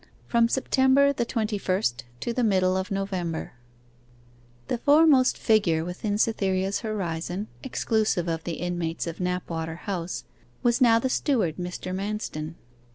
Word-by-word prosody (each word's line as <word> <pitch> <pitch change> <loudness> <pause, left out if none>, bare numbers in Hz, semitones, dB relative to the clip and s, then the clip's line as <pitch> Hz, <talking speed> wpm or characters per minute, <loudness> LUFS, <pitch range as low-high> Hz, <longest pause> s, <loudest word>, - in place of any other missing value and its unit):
FROM 235 -1 +3
SEPTEMBER 265 +2 +3
THE 240 -3 -1
TWENTY 220 -3 -1
FIRST 125 -12 -1 0.2
TO 235 - -2
THE 250 - 0
MIDDLE 185 -4 +3
OF 190 0 -2
NOVEMBER 190 -6 -3 1.1
The 240 - -1
foremost 290 -2 +5
figure 175 -8 +2
within 205 +4 -2
Cytherea's 195 -3 +1
horizon, 190 -2 -3
exclusive 220 -8 0
of 165 -1 -2
the 170 - -3
inmates 175 -1 -3
of 170 -1 -6
Knapwater 170 -3 -2
House, 180 -4 -4 0.4
was 240 +2 +2
now 230 -2 +6
the 230 - 0
steward, 240 - 0
Mr. 180 0 -5
Manston. 190 -5 -4
195 Hz, 135 wpm, -26 LUFS, 175-230 Hz, 1.1 s, now